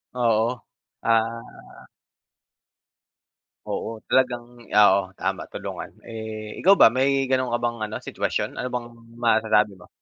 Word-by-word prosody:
Oo. 120 0 +1 0.4
Ah. 115 0 -2 1.8
Oo 115 0 -4
talagang 125 -2 +2 0.3
oo, 100 -2 +7 0.2
tama - - -2
tulungan. - - -6
Eh, 110 -1 -7
ikaw 195 +2 +7
ba, - - +9
may 135 +1 +2
ganon 130 -1 +1
ka - - +3
bang 120 0 0
ano, 110 - -6
sitwasyon? - - -3
Ano 125 - -2
bang 120 -1 -2 0.3
masasabi 110 -3 +3
mo? 90 - -15
115 Hz, 120 wpm, -24 LUFS, 110-125 Hz, 1.8 s, ba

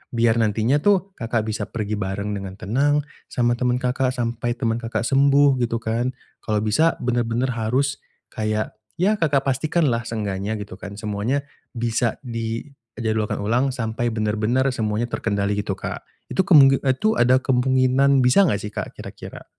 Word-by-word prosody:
Biar 115 0 +3
nantinya 110 +5 +2
tuh 195 +2 +2
Kakak 115 -1 -1
bisa 110 - -3
pergi 105 -2 -3
bareng 100 +2 -3
dengan 95 -2 -5
tenang 140 +9 +1 0.2
sama 120 -1 0
temen 125 -1 +1
Kakak, 130 0 0
sampai 120 0 -2
temen 115 -2 -1
Kakak 115 -2 -3
sembuh 140 +1 +4
gitu, 120 -1 0
kan. 120 +3 -1 0.2
Kalau 105 -1 -1
bisa 155 +10 +2
bener-bener 120 +1 0
harus 125 +5 0 0.3
kayak 110 0 -2 0.2
ya 205 +4 +1
Kakak 140 -4 +2
pastikanlah 135 -3 0
seenggaknya 105 -1 -3
gitu 100 -3 -8
kan. 100 0 -8
Semuanya 110 +6 -2 0.3
bisa 115 0 0
dijadwalkan 115 -2 -4
ulang 125 +5 +1
sampai 115 0 -2
bener-bener 110 +4 0
semuanya 110 0 -2
terkendali 100 -2 -1
gitu, 100 -1 -2
Kak. - - -5 0.3
Itu 190 - +1
kemungi 135 -5 +7
itu 135 +11 +1
ada 130 +2 +4
kemunginan 130 +1 +3
bisa 175 +10 +5
enggak 100 - 0
sih, 105 - -5
Kak, - - -6
kira-kira? - - -10
120 Hz, 150 wpm, -22 LUFS, 110-135 Hz, 0.3 s, kemungi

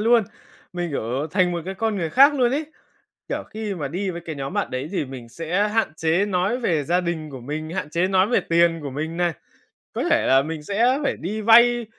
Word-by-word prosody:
luôn. 230 0 +4 0.5
Mình, 175 -2 -3
kiểu, 135 +3 -2
thành 180 +1 +2
một 170 - -2
cái 190 - -5
con 220 +1 -1
người 165 -4 -2
khác 280 - +6
luôn 250 -3 +2
ấy, 295 +4 -1 0.6
kiểu, - - -3
khi 215 -2 -4
mà 150 -6 -4
đi 185 +6 -3
với 170 -1 -6
cái 160 -3 -6
nhóm 135 0 -5
bạn - - -1
đấy 130 +3 -4
thì 185 - -1
mình 130 -3 -9
sẽ 175 - -1
hạn 220 -6 0
chế 165 +5 +1
nói 190 +5 0
về 165 - 0
gia 175 +4 +1
đình 165 -3 -4
của 130 -3 -8
mình, 155 +5 -5
hạn 160 -4 -4
chế 175 +3 +1
nói 190 0 +3
về 245 - +3
tiền 170 0 +2
của 140 - -5
mình 155 +4 -4
này. 175 -1 +1 0.6
Có - - -2
thể - - +3
là 135 0 +5
mình 155 +1 -5
sẽ 235 - +2
phải - - -1
đi 210 +6 -4
vay, 235 +2 +6
175 Hz, 235 wpm, -23 LUFS, 155-210 Hz, 0.6 s, khác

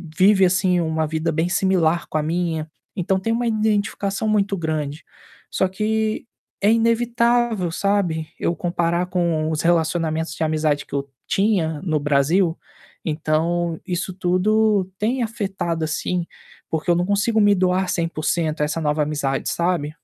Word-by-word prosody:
vive 195 0 +5
assim 180 0 +2
uma 160 -1 0
vida 160 +1 -1
bem 165 +2 0
similar 175 -3 +1
com 155 - -1
a 150 - -1
minha, 160 -1 -2 0.3
então 190 +1 0
tem 225 +4 -1
uma 240 +1 0
identificação 210 -2 0
muito 205 -2 +1
grande. 155 -2 -3 0.5
Só 190 - +1
que 215 +3 -1 0.4
é 205 +2 +4
inevitável 230 -4 +2
sabe, 175 -5 0
eu 170 - 0
comparar 170 0 0
com 170 -4 0
os 155 - -1
relacionamentos 165 -1 +1
de - - -2
amizade 155 -2 +1
que - - -17
eu 140 0 -3 0.2
tinha 180 -7 +1
no 155 -5 0
Brasil, 150 +5 +2 0.5
então, 165 +2 0
isso 180 +1 -2
tudo 195 +3 +2
tem 240 +4 0
afetado, 195 -7 -3
assim, 175 +3 -2 0.4
porque 160 +2 -2
eu 175 - +5
não 175 - +1
consigo 205 +3 +2
me 205 0 +5
doar 185 0 +1
100% 165 -2 -1
a 150 - +3
essa 155 +2 -2
nova 150 0 +1
amizade, 145 -2 -1
sabe. 170 -4 0
175 Hz, 150 wpm, -22 LUFS, 160-200 Hz, 0.5 s, vive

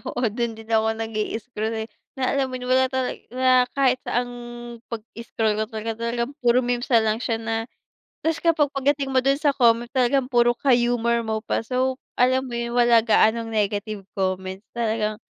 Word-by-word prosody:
oo, 245 - -2
dun 235 0 -2
din 220 0 -12
ako 220 0 +2
nag-i-scroll, 225 0 -3
eh. 220 - -9 0.3
Na 260 -1 0
alam 275 -1 +1
mo 255 - -6
yun, 250 0 -4
wala 260 0 +4
tala 260 -1 -1 0.2
wala 255 0 +3
kahit 260 -2 +3
saan 245 - +1
ang - - -9 0.5
'pag 225 -2 -6 0.2
scroll 220 -2 -1
ko - - +2
talaga, 220 0 -4 0.2
talagang 235 +2 -2
puro 245 0 +3
meme's 245 0 -1
na 235 -3 +5
lang 215 0 0
siya 235 -2 -1
na 225 +1 -3 0.6
tapos 325 0 +1
kapag 315 -4 +2
pagdating 275 0 0
mo 260 - +1
dun 270 +2 +3
sa 290 0 +1
comment 235 -3 +3
talagang 260 0 +1
puro 240 -1 +4
ka-humor 240 -2 +2
mo 220 0 -2
pa. 225 +1 -2
So, 255 +1 0 0.2
alam 255 +1 +2
mo 245 - -8
yun 235 0 -3
wala 235 -1 +5
gaanong 225 0 +3
negative 205 -1 -2
comment, 190 0 -2
talagang 220 -2 -1
235 Hz, 190 wpm, -23 LUFS, 220-255 Hz, 0.6 s, na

